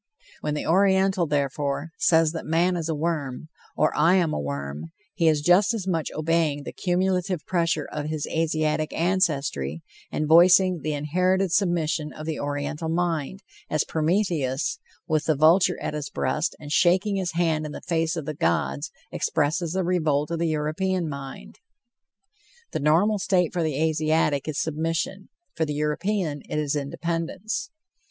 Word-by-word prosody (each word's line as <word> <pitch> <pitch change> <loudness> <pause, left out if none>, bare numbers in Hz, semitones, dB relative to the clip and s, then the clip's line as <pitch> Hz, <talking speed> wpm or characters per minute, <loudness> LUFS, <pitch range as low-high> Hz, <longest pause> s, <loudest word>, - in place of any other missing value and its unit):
When 150 - -2
the 150 - -3
Oriental, 190 0 +3
therefore, 145 +1 -1
says 160 -2 +4
that 165 - -5
man 170 +3 +2
is 165 -2 -3
a 160 - 0
worm 155 -3 -3 0.3
or 155 - +2
"I 175 +3 +4
am 170 -4 +2
a - - -1
worm," 70 +1 -4 0.3
he 170 -5 +1
is 155 -2 +3
just 185 +8 +4
as 205 -5 -4
much 165 -4 -1
obeying 155 -2 0
the - - -6
cumulative 180 -2 0
pressure 170 -4 0
of 150 0 -4
his 155 -1 -2
Asiatic 155 -1 0
ancestry, 145 - 0 0.3
and 155 - -1
voicing 180 +2 +6
the 155 +1 -2
inherited 180 +5 +1
submission 165 -5 0
of 155 - -8
the 160 -2 -3
Oriental 145 +3 -3
mind, 170 +2 -1 0.3
as 155 -1 +1
Prometheus, 160 -4 0 0.3
with 155 -2 0
the 155 - +2
vulture 170 +5 +4
at - - -3
his 150 -2 -4
breast, 150 +6 -1
and 145 -1 -9
shaking 190 +5 +3
his 185 -3 -2
hand 160 -2 0
in - - -8
the - - -7
face 165 -1 0
of 160 -4 -4
the 155 - -3
gods, 70 - -1 0.2
expresses 160 +2 0
the 190 0 0
revolt 155 -4 0
of 165 - -2
the 170 - +1
European 160 +4 -1
mind. 135 - -8 1.1
The - - -2
normal 180 +8 +3
state 180 -3 +1
for 175 - 0
the 155 -3 -1
Asiatic 155 -2 +1
is 155 -2 -3
submission; 165 +5 -2 0.3
for 160 - 0
the 150 -2 -2
European 150 +1 -1
it - - -2
is 150 -1 0
independence. 170 - -3
160 Hz, 160 wpm, -25 LUFS, 150-175 Hz, 1.1 s, voicing